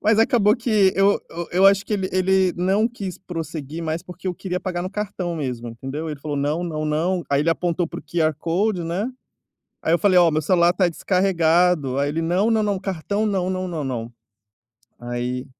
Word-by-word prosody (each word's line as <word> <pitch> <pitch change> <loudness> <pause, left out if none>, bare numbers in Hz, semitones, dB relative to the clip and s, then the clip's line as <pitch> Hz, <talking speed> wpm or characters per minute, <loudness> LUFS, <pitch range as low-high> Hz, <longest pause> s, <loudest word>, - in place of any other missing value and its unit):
Mas 215 +1 +3
acabou 225 -2 +4
que 215 -6 +3
eu 195 +1 +4
eu 170 0 -6
eu 185 +2 +5
acho 195 0 +4
que - - -4
ele 190 -2 0
ele 185 0 +2
não 195 +5 +2
quis 200 -6 -6
prosseguir 165 -4 -6
mais 160 0 -3
porque 180 0 -10
eu 180 - -1
queria 180 +1 -3
pagar 180 -2 -3
no 185 - -4
cartão 195 -4 -3
mesmo, 125 -5 -4
entendeu? 135 +7 -5
Ele 150 - -6
falou: 145 0 -4
"Não 150 +5 -1
não 155 -3 -3
não." 170 +4 0
Aí 140 - +3
ele 165 - +2
apontou 175 +1 0
para - - -7
o - - -20
QR 160 -1 0
code, 180 +4 0
né, 175 +7 -2 0.7
aí 160 - +1
eu 170 - +3
falei: 190 -3 +4
"Ó, 175 -2 +6
meu 155 +1 +1
celular 170 +2 +3
está 180 0 +2
descarregado." 175 -5 +2
Aí 145 - +1
ele: 160 +3 -2
"Não, 180 +7 +1
não, 220 -1 +2
não, 205 -2 0
cartão 195 +3 -2
não, 190 -3 0
não, 185 0 -2 0.2
não." 120 -3 -4 0.9
Aí 120 +1 -3
175 Hz, 205 wpm, -22 LUFS, 155-195 Hz, 0.9 s, Ó